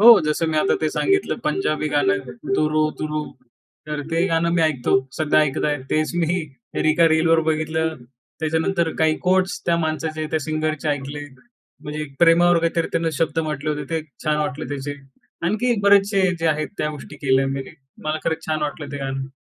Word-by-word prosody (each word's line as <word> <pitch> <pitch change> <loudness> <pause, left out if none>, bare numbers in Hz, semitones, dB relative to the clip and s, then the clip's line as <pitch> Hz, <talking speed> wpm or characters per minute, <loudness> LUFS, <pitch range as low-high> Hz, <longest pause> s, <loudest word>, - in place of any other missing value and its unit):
हो 225 - +8 0.2
जसं 150 +2 0
मी 160 - -1
आता 195 - +3
ते 155 - +1
सांगितलं 390 0 +1
पंजाबी 390 +2 0
गाणं. 395 +1 +3 0.4
'दुर 155 -4 +1 0.3
दुरू.' 155 0 -2 0.7
तर 150 -1 -2
ते 165 - +2
गाणं 165 -1 +1
मी 165 - +4
ऐकतो 145 -6 +1 0.2
सध्या 155 -1 +3
ऐकत 135 - -2
आहे. 145 0 0
तेच 155 0 +1
मी 175 +3 +1 0.5
एका 165 +1 +5
रीलवर 165 +1 +4
बघितलं. 160 +1 0 0.5
त्याच्यानंतर 160 +2 +1
काही 160 0 +3
कोट्स 185 0 +2
त्या 170 -1 +3
माणसाचे 155 0 -2
त्या - - +3
सिंगरचे 155 -1 -1
ऐकले. 145 0 -3 0.6
म्हणजे 150 +1 -4
प्रेमावर 170 +1 +5
काहीतरी 165 0 0
त्यानं 165 -1 +1
शब्द 165 0 0
म्हटले 150 0 -2
होते 150 -1 -3
ते 165 -1 0 0.2
छान 150 0 +2
वाटले 150 0 -2
त्याचे. 140 +1 -4 0.5
आणखी 235 +5 +1
बरेचसे 200 0 +4 0.2
जे 165 - -1
आहेत 155 +1 -3
त्या 150 - 0
गोष्टी 150 -2 -9
केल्या 130 +1 +4
मी. 135 0 -2 0.4
मला 155 0 -1
खरंच 160 0 -2
छान 155 -1 -1
वाटलं 145 0 -3
ते 145 - -3
गाणं. 135 0 -4
155 Hz, 175 wpm, -22 LUFS, 150-165 Hz, 0.7 s, हो